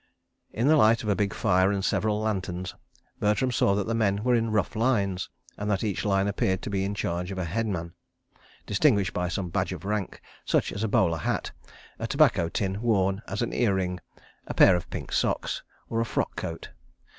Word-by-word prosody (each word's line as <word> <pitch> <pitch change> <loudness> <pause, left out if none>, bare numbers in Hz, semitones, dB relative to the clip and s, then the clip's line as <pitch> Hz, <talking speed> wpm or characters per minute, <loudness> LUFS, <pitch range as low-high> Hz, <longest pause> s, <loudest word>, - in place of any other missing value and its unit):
In 115 +5 0
the 155 +1 +6
light 115 -3 +4
of 105 - -2
a 100 - +3
big 100 0 0
fire 95 -3 +2
and 100 -1 -1
several 105 0 +1
lanterns, 95 -4 -2 0.5
Bertram 105 +5 +1
saw 100 -4 +2
that 100 -1 0
the 115 - -1
men 105 -2 +1
were 125 0 +3
in 115 -1 +2
rough 110 0 0
lines, 105 -6 0 0.3
and 105 0 -2
that 100 -2 0
each 100 -4 -1
line 100 -1 +2
appeared 95 -2 0
to - - -4
be 95 -1 0
in 100 +1 -2
charge 90 -1 -2
of 95 - -5
a 90 - -2
headman, 90 -3 -2 0.7
distinguished 105 -4 +2
by 90 0 -1
some 90 0 -3
badge - - -1
of - - -8
rank, 105 -2 -2 0.2
such - - +1
as 100 - -3
a - - +1
bowler 85 -5 +2
hat, - - -2 0.5
a - - -2
tobacco 85 - +3
tin 100 +1 -2
worn 100 -4 +1
as 100 +5 -2
an 120 - -3
ear 105 -6 +2
ring, 90 -1 -2 0.5
a - - -5
pair 95 - +7
of 90 0 -4
pink - - -6
socks, - - 0 0.3
or 115 0 -1
a - - 0
frock - - -2
coat. - - -6
100 Hz, 205 wpm, -27 LUFS, 95-110 Hz, 0.7 s, pair